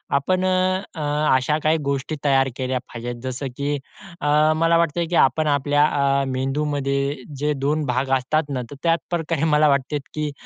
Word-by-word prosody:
आपण 185 +6 +1
अ, - - +2 0.5
अ, 155 - -5 0.3
अशा 140 +4 +1
काही 155 +1 +3
गोष्टी 140 +2 -2
तयार 135 -2 +3
केल्या 130 -1 -2
पाहिजेत 120 +1 -6
जसं, 130 +2 -4
की 145 +1 -1 0.5
अ, 150 +1 +3
मला 165 +1 +3
वाटतंय, 170 0 +1
की 175 - -2
आपण 155 -1 +3
आपल्या 145 +1 +2 0.4
अ, - - 0
मेंदूमध्ये 140 +1 -1 0.2
जे 150 +2 0
2 145 +3 -1
भाग 130 +1 -1
असतात 155 +5 0
ना 130 -3 -2
तर - - -7
त्याचप्रकारे 165 -2 0
मला 150 0 +4
वाटते, 140 +2 +1 0.2
की 150 -1 -2
145 Hz, 165 wpm, -22 LUFS, 135-155 Hz, 0.5 s, मला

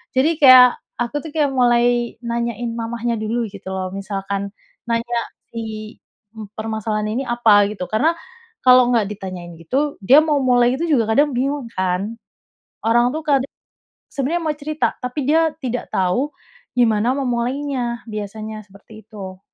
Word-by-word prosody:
Jadi 300 +5 +2
kayak 255 -2 +8 0.2
aku, 240 +4 -2
tuh, 315 - -7
kayak 295 -3 +2
mulai 240 -1 +2
nanyain 235 0 -2
mamanya 235 0 -2
dulu, 230 +2 -1
gitu, 195 -1 -10
loh. 185 -1 -3
Misalkan 195 0 -4 0.4
nanya 235 +1 -1 0.4
si 220 -1 -6 0.6
permasalahannya 220 -1 -2
ini - - -5
apa, 225 -4 +5
gitu, 195 -3 -5
karena 280 +10 +2 0.5
kalau 250 -1 +7
nggak 225 -3 +3
ditanyain 185 -4 -7
gitu, 275 - -1
dia 265 +9 +7
mau 300 -2 +1
mulai 245 -1 +3
itu 305 - -3
juga 255 -7 +3
kadang 290 +5 +3
bingung, 275 0 -1
kan. 185 +4 -1 0.7
Orang, 240 +2 +3
tuh, 315 - -3
kadang 275 -2 +2 0.6
sebenarnya 300 +6 -1
mau 305 - 0
cerita 305 +1 -1
tapi 250 +3 -3
dia 320 +1 +4
tidak 245 -1 -3
tau 190 +11 +1 0.5
gimana 230 0 +3
memulainya, 250 -1 -2
biasanya 215 +1 -6
seperti 210 +2 -15
itu. 195 -3 -9
235 Hz, 140 wpm, -20 LUFS, 215-260 Hz, 0.7 s, kayak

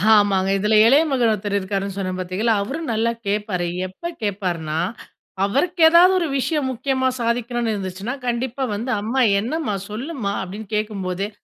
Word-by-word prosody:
ஆமாங்க, 195 -2 +3
இதுல 210 +2 +2
இளய 275 +7 +6
மகன் 240 -4 +3
ஒருத்தர் 205 -1 -1
இருக்காருன்னு 195 0 -3
சொன்னேன், 185 -1 -3
பாத்தீகளா 185 +6 0
அவரும் 300 +10 -4
நல்லா 230 +2 +1 0.2
கேப்பாரு. 200 -4 -1 0.2
எப்ப 340 - -7
கேப்பாருன்னா, 180 -7 -2 0.7
அவருக்கு 330 - 0
ஏதாவது 350 +3 +7
ஒரு 335 - 0
விஷயம் 285 0 0
முக்கியமா 260 +1 0
சாதிக்கணும்னு 235 0 -1
இருந்துச்சுன்னா! 195 +5 -4
கண்டிப்பா 245 +2 -1
வந்து, 235 +5 -3
"அம்மா 235 +5 0 0.2
என்னம்மா? 245 0 -2
சொல்லுமா"அப்டின்னு 210 - -4
கேக்கும்போதே, 200 -2 -2
215 Hz, 135 wpm, -21 LUFS, 195-260 Hz, 0.7 s, ஏதாவது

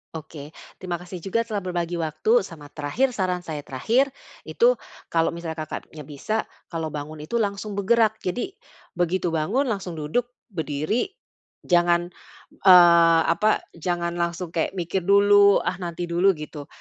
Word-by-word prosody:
Oke. 155 -2 -9 0.2
Terima 175 -2 -4
kasih 180 -1 -9
juga 195 +4 0
telah 205 -3 -3
berbagi 175 -1 -2
waktu. 170 - +1
Sama 150 -3 -10
terakhir, 160 - -1
saran 185 -2 0
saya 155 -4 -6
terakhir, 235 - +1 0.3
itu - - +3 0.3
kalau 165 -1 +1
misalnya 170 -1 -6
Kakaknya 155 0 -8
bisa, 155 +10 -3 0.2
kalau 165 -2 -4
bangun 150 +1 -6
itu 235 +10 -2
langsung 205 0 -2
bergerak. 220 +1 +2
Jadi, 245 - -3 0.4
begitu 175 0 0
bangun, 220 - 0
langsung 190 -5 -4
duduk, 155 +11 -1 0.2
berdiri. 160 - -1 0.6
Jangan, 175 0 +2 0.5
eee, 170 -2 +7
apa, 215 +6 +2
jangan 170 +1 -2
langsung 170 0 -2
kayak 165 +3 -1
mikir 180 +1 -1
dulu, 200 0 +6
"Ah, - - -2
nanti 175 -1 -4
dulu," 185 +2 +3
gitu. 150 -1 -8
175 Hz, 145 wpm, -24 LUFS, 160-200 Hz, 0.6 s, eee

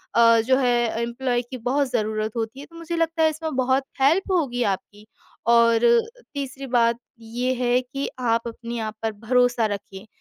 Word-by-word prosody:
अ, 230 -1 +6
जो 260 0 +4
है 245 -2 +2 0.2
एम्प्लॉयी 240 +1 -1
की 255 - -4
बहुत 260 +4 0
ज़रूरत 215 -2 -1
होती 230 +3 -4
है 285 - -8
तो 335 - -19
मुझे 335 0 -5
लगता 330 0 +1
है 315 - +5
इसमें 315 -1 -5
बहुत 260 +1 +2 0.2
हेल्प 340 +8 +3
होगी 265 -9 +1
आपकी 205 +2 -11 0.4
और 235 0 +4
अ, 235 0 +6 0.3
तीसरी 275 -1 -5
बात 235 -1 +2 0.2
ये 240 +3 -2
है 245 +1 +3
कि 275 +2 -5
आप 230 -1 0
अपने 235 0 -6
आप 215 -1 -4
पर 225 - -1
भरोसा 240 +2 +1
रखिए। 200 0 -6
245 Hz, 180 wpm, -23 LUFS, 230-270 Hz, 0.4 s, अ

